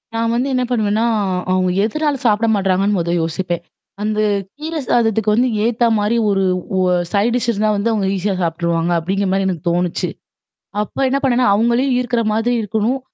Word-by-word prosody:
நான் 230 Hz, 0 st, 0 dB
வந்து 250 Hz, +3 st, 0 dB
என்ன 255 Hz, -, +1 dB
பண்ணுவேன்னா, 220 Hz, -1 st, +1 dB, 0.5 s
அவங்க 185 Hz, 0 st, +2 dB
எதனால 295 Hz, +7 st, 0 dB
சாப்பிட 220 Hz, 0 st, +3 dB
மாட்றாங்கன்னு 195 Hz, +1 st, +1 dB
முத 170 Hz, -1 st, -1 dB
யோசிப்பேன். 170 Hz, +1 st, -3 dB, 0.4 s
அந்த 215 Hz, 0 st, -1 dB, 0.4 s
கீரை 315 Hz, +2 st, -4 dB
சாதத்துக்கு 220 Hz, -2 st, +2 dB
வந்து 245 Hz, +4 st, +3 dB, 0.2 s
ஏத்த 235 Hz, +1 st, +1 dB
மாரி 210 Hz, +2 st, +1 dB
ஒரு 195 Hz, -1 st, +1 dB, 0.3 s
ஒ -, -, +2 dB, 0.3 s
சைட் 210 Hz, +4 st, +1 dB
டிஷ் 240 Hz, -1 st, 0 dB
இருந்தா 215 Hz, 0 st, 0 dB
வந்து 220 Hz, +3 st, 0 dB
அவங்க 205 Hz, -3 st, 0 dB
ஈஸியா 195 Hz, +1 st, -1 dB
சாப்பிட்டுருவாங்க, 170 Hz, 0 st, -1 dB
அப்டிங்கிற 195 Hz, +4 st, -1 dB
மாதரி 195 Hz, 0 st, +1 dB
எனக்கு 180 Hz, -1 st, -3 dB
தோணுச்சு. 175 Hz, 0 st, -1 dB, 0.7 s
அப்ப 210 Hz, -, -7 dB
என்ன 275 Hz, +1 st, +1 dB
பண்ணேனா 250 Hz, -2 st, +2 dB
அவங்களையும் 240 Hz, +5 st, +2 dB
ஈர்க்குற 245 Hz, -1 st, 0 dB
மாதிரி 225 Hz, +3 st, +1 dB
இருக்கணும் 220 Hz, +5 st, -1 dB
210 Hz, 165 wpm, -18 LUFS, 190-235 Hz, 0.7 s, சாப்பிட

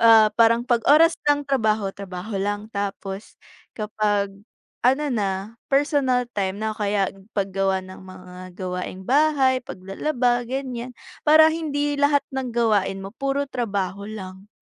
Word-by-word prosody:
Ah, 225 Hz, -2 st, +7 dB
parang 230 Hz, +1 st, +4 dB
'pag 240 Hz, -2 st, +2 dB
oras 325 Hz, +4 st, +6 dB, 0.2 s
ng 290 Hz, 0 st, +1 dB
trabaho, 220 Hz, -7 st, +1 dB
trabaho 195 Hz, +1 st, -7 dB
lang. 205 Hz, +1 st, -2 dB
Tapos 200 Hz, 0 st, -5 dB, 0.4 s
kapag 210 Hz, -2 st, 0 dB, 0.5 s
ano 270 Hz, +4 st, +3 dB
na, 210 Hz, -5 st, 0 dB, 0.4 s
personal 275 Hz, -3 st, +2 dB
time 195 Hz, -3 st, -1 dB
na 220 Hz, -, 0 dB
o -, -, -14 dB
kaya 200 Hz, -2 st, +1 dB, 0.3 s
paggawa 195 Hz, -1 st, 0 dB
ng 185 Hz, 0 st, -11 dB
mga 185 Hz, -1 st, -12 dB, 0.2 s
gawaing 185 Hz, 0 st, -5 dB
bahay, 270 Hz, 0 st, +3 dB
paglalaba, 245 Hz, +5 st, -1 dB
ganiyan, 255 Hz, -2 st, -4 dB, 0.3 s
para 315 Hz, +1 st, +7 dB
hindi 290 Hz, -3 st, -1 dB
lahat 285 Hz, 0 st, +3 dB
ng 265 Hz, -2 st, -3 dB
gawain 210 Hz, -5 st, +1 dB
mo 195 Hz, -, -7 dB
puro 275 Hz, +2 st, -1 dB
trabaho 200 Hz, -5 st, -3 dB
lang. 190 Hz, -2 st, -8 dB
220 Hz, 135 wpm, -23 LUFS, 195-270 Hz, 0.5 s, Ah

